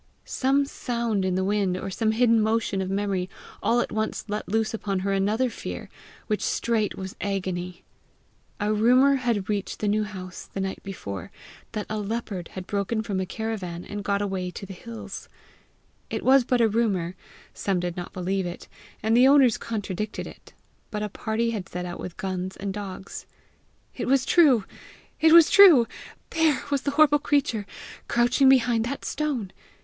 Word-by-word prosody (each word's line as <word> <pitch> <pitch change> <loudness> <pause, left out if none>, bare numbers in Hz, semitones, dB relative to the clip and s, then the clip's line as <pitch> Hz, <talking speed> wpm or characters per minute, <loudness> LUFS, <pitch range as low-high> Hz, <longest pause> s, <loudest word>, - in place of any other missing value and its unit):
Some 275 +2 +1
sound 235 -6 -2
in 185 -1 0
the 190 - +1
wind 195 -2 +1
or 195 - -5
some 220 +3 0
hidden 230 -1 +4
motion 220 -2 0
of 190 - -3
memory 195 -2 -1 0.3
all 240 +1 +3
at - - -3
once 220 0 -2
let 210 -1 -4
loose 220 +2 0
upon 200 -4 -2
her 195 +1 0
another 210 +6 +1
fear, 240 - -7 0.4
which 210 -2 -1
straight 225 -3 0
was 190 0 -6
agony. 180 -3 -3 0.8
A 210 +1 +1
rumour 255 +6 +5
had 235 -6 -1
reached 205 -2 -2
the 210 - -2
New 215 +1 +2
House 185 -3 -8
the - - -5
night 190 0 -3
before, 100 - -7 0.4
that 215 -2 -3
a 215 0 -3
leopard 205 -4 -4
had 185 -1 -6
broken 205 +3 -1
from 200 -3 -2
a 190 - -2
caravan, 195 -6 -4
and 205 0 -6
got 200 0 0
away 190 -2 -2
to 190 - -8
the 195 - -8
hills. 230 +4 -8 0.8
It - - -3
was 265 -1 +6
but 250 -1 +2
a 230 - +5
rumour; 200 -6 0 0.4
some 195 -3 -1
did 175 -1 -3
not 175 -1 -6
believe 190 0 -2
it, 175 - -8 0.4
and 220 +1 +3
the 250 +2 +7
owners 270 -4 +5
contradicted 210 -1 -4
it, - - -13 0.4
but 210 -1 -3
a 210 - -2
party 225 +3 -1
had 200 -6 -5
set 180 0 -4
out 175 -1 -6
with 180 - -7
guns 190 -2 -4
and 195 0 -4
dogs. 195 -1 -7 0.7
It - - -3
was 265 0 +3
true! 275 - +5 0.5
it 320 0 +5
was 335 -1 +8
true! 350 - +8 0.5
There 320 -4 +3
was 280 -2 +1
the 280 - -1
terrible 295 -1 +5
creature 255 -8 0 0.4
crouching 245 +3 +4
behind 245 -3 +4
that 275 +3 -4
stone! 275 -10 -2
210 Hz, 175 wpm, -25 LUFS, 190-240 Hz, 0.8 s, was